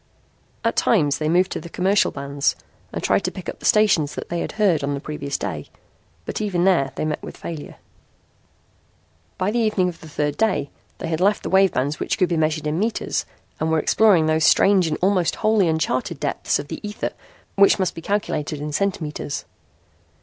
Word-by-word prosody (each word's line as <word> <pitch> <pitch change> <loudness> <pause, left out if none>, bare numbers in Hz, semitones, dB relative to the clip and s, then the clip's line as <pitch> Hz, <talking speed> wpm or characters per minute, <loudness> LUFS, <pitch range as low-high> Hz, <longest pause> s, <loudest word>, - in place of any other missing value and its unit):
At - - +1
times 150 -11 +2
they 155 0 0
moved 180 +3 +3
to - - -3
the 170 - -9
commercial 195 +4 +2
bands 140 0 -1 0.4
and - - -5
tried 200 - +2
to - - +1
pick 185 - -9
up - - -5
the - - -2
stations 195 -9 +3
they 170 - -2
had - - -4
heard 190 -9 +2
on 140 0 -1
the - - -4
previous 140 -1 -4
day, 80 -8 -5 0.6
but - - -4
even 185 -5 0
there 170 -8 +3
they - - -2
met 155 -1 -2
with - - -9
failure. 160 -3 -7 1.6
By 190 +2 0
the 240 - 0
evening 210 -5 +2
of 170 - -10
the 160 - -11
third 145 0 -2
day 190 -11 0 0.3
they - - -5
had 165 +1 -2
left 200 +2 +2
the - - -4
wave 190 -1 +5
bands 145 +4 -1
which - - -1
could 185 - +2
be 170 - +1
measured 155 -1 0
in 150 +3 -1
meters 220 +2 -1 0.3
and 160 - 0
were 160 - +2
exploring 185 +1 +4
those 155 0 +2
strange 190 +3 +5
and 155 - -1
almost 185 -3 +2
wholly 215 -4 +2
uncharted 160 -6 -1
depths - - 0
of 145 0 -7
the - - -5
ether 210 0 -4 0.4
which 200 0 +5
must 190 -3 0
be 165 - -8
calculated 160 -6 -2
in 150 +1 -4
centimeters. 155 -5 -2
165 Hz, 200 wpm, -22 LUFS, 150-195 Hz, 1.6 s, wave